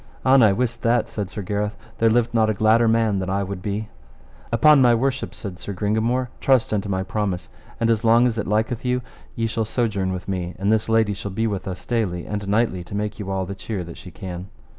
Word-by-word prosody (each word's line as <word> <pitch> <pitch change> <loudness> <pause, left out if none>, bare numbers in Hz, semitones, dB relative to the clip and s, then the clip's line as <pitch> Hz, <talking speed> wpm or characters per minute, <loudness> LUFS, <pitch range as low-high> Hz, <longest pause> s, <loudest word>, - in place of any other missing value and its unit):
An 130 0 +6
I 110 -3 +6
wist 120 +3 -1
that, 120 +1 +2
said 100 -3 -4
Sir 105 +1 -6
Gareth, 105 +2 -2 0.2
there 115 - +4
lived 120 +1 +2
not 110 -1 +3
a 110 - 0
gladder 110 +3 +4
man 110 -3 +2
than 95 0 -3
I 100 +1 0
would 95 -1 -5
be. 105 +2 -3 0.6
Upon 140 +5 +6
my 120 -2 +6
worship, 135 +3 -1
said 95 -6 -7
Sir 100 - -6
Gringamore, 110 +6 0
trust 130 -5 +3
unto 100 -1 -1
my 95 -1 0
promise; 95 -2 -2 0.3
and 115 - +2
as 115 0 +1
long 115 +2 +5
as 115 -2 0
it - - -3
liketh 110 +3 0
you 125 0 0 0.3
ye 115 - -1
shall 115 0 -1
sojourn 105 -4 -1
with 90 -1 -5
me, 90 -2 -3
and 100 +3 +1
this 110 0 +1
lady 110 -2 +3
shall 100 +1 -5
be 110 +4 -1
with 100 -4 -2
us 95 -1 -6
daily 100 -8 -1
and 105 -1 -4
nightly 100 -3 +1
to 100 - -7
make 105 +1 -3
you 100 -2 -5
all 95 -1 -1
the 100 - -5
cheer 100 -1 -5
that 85 -1 -10
she - - -10
can. 90 +1 -7
105 Hz, 235 wpm, -23 LUFS, 95-115 Hz, 0.6 s, An